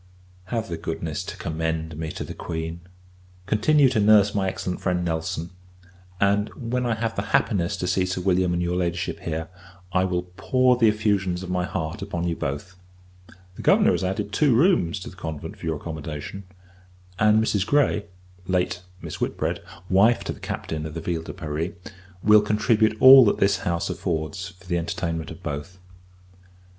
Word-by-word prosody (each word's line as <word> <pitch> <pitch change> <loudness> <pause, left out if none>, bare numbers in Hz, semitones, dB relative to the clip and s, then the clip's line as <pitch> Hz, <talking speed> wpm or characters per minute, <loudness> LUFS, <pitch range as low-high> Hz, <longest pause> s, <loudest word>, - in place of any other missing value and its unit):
Have 110 +3 -3
the 85 - -4
goodness 80 -1 -4
to - - -7
commend 80 0 -3
me 80 0 -4
to - - -5
the - - -7
Queen; 80 0 -5 0.7
continue 135 +9 +4
to 120 - +1
nurse 105 -1 +5
my 100 -2 0
excellent 90 -1 -4
friend, 90 -2 0
Nelson; 80 0 -3 0.7
and, 100 +2 +2
when 125 0 -2
I 115 - +1
have 115 0 -2
the - - -1 0.2
happiness 90 -6 -1
to - - -3
see 90 +1 +1
Sir 90 0 -2
William 90 -1 +2
and 85 0 0
your 85 +1 -1
Ladyship 85 -1 -2
here, 80 0 -4 0.5
I 95 0 +3
will 90 -1 -1
pour 130 -1 +3
the 120 -2 +4
effusions 100 -4 +1
of 90 - -5
my 90 -1 0
heart 80 +4 -4
upon 90 -3 -3
you 85 - -1
both. 75 +7 -4 0.8
The - - -9
Governor - - +5
has - - 0
added 95 +2 -2
two 140 +2 +3
rooms 115 - +3
to - - -7
the - - -15
convent, 80 -4 -6
for - - -6
your 80 - 0
accommodation; 80 +4 -6 0.7
and 105 0 +5
Mrs. 105 -3 +1
Grey, 125 -6 +2 0.4
late 90 -1 0 0.2
Miss - - -7
Whitbread, - - -1 0.3
wife 100 +6 +4
to - - -3
the - - -14
Captain 80 -1 -4
of 80 - -9
the 85 - -4
Ville 85 0 -2
de 80 - -8
Paris, 80 +3 -3 0.5
will 105 0 +7
contribute 110 +1 +2
all 130 0 +10
that 100 - +2
this 100 0 +3
house 85 -1 -1
affords 80 +2 -3
for 95 - -19
the 90 -1 0
entertainment 85 -1 -3
of - - -10
both. 75 +6 -5
90 Hz, 180 wpm, -24 LUFS, 85-105 Hz, 0.8 s, all